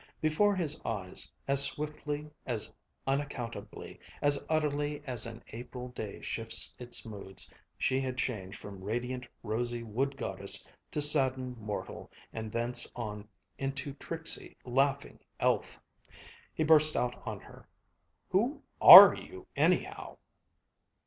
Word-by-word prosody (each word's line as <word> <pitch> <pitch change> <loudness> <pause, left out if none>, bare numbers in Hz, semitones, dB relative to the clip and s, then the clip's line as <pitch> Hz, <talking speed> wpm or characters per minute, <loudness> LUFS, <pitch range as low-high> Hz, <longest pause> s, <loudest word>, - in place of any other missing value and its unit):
Before 195 +7 +2
his 155 -5 0
eyes, 95 -5 -1 0.2
as 140 0 +6
swiftly, 150 +1 -2 0.2
as 115 -4 0 0.3
unaccountably, 135 -4 -5 0.2
as 145 -1 +2
utterly 150 -1 -1
as 125 -4 0
an 115 -1 -10
April 125 +2 -8
day 110 -5 -8
shifts 115 -1 -1
its 120 -1 +1
moods, 100 -3 -7 0.3
she 130 +1 0
had 130 -1 -4
changed 100 -7 -4
from 100 -2 -11
radiant, 125 +4 -4 0.2
rosy 120 +2 -3
wood 135 +5 -2
goddess 130 - -3 0.2
to 150 - -2
saddened 130 -4 +3
mortal 105 -1 -6 0.2
and 110 -1 -6
thence 120 +1 +1
on 105 -3 -6 0.3
into 135 +1 -3
tricksy, 160 +3 -5
laughing 135 +2 0 0.2
elf. - - 0 0.7
He 155 - -2
burst 155 0 +5
out 125 0 -2
on - - -4
her, - - -16 0.6
"Who 250 +10 0 0.2
are - - +13
you, 375 0 -10
anyhow?" - - 0
130 Hz, 120 wpm, -30 LUFS, 115-145 Hz, 0.7 s, are